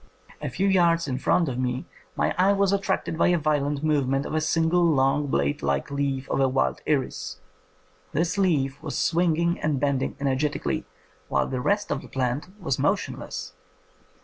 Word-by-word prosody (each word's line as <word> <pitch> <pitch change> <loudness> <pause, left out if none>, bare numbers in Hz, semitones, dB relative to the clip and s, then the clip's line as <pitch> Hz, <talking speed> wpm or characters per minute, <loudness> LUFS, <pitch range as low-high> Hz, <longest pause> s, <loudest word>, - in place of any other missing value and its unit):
A - - -2
tew 195 - -1
yards 170 -4 +3
in 130 -1 -2
front 170 +4 +2
of 130 -2 -3
me 125 0 -1 0.3
my - - +1
eye 190 +2 +4
was 200 -1 +2
attracted 195 -4 -1
by - - +4
the 175 - +3
violent 145 -2 0
movements 140 -3 +1
of - - -5
a 155 - +1
single 165 +2 +2
long 145 -2 +2
blade 70 - 0
like 70 - -1
leaf 140 -1 -1
of - - +1
a 135 -1 +3
wild 130 +1 0
iris. 140 -4 -1 0.7
This 165 +4 0
leaf 145 -8 +1
was 155 -2 -4
swinging 170 0 +1
and 150 -3 0
bending 140 -1 0
energetically, 140 +1 -1 0.4
while - - +1
the 130 -1 -3
rest 205 +5 0
of 145 - -1
the - - -12
plant 130 +3 -2
was 160 -9 -1
motionless. - - -2
150 Hz, 175 wpm, -25 LUFS, 135-170 Hz, 0.7 s, eye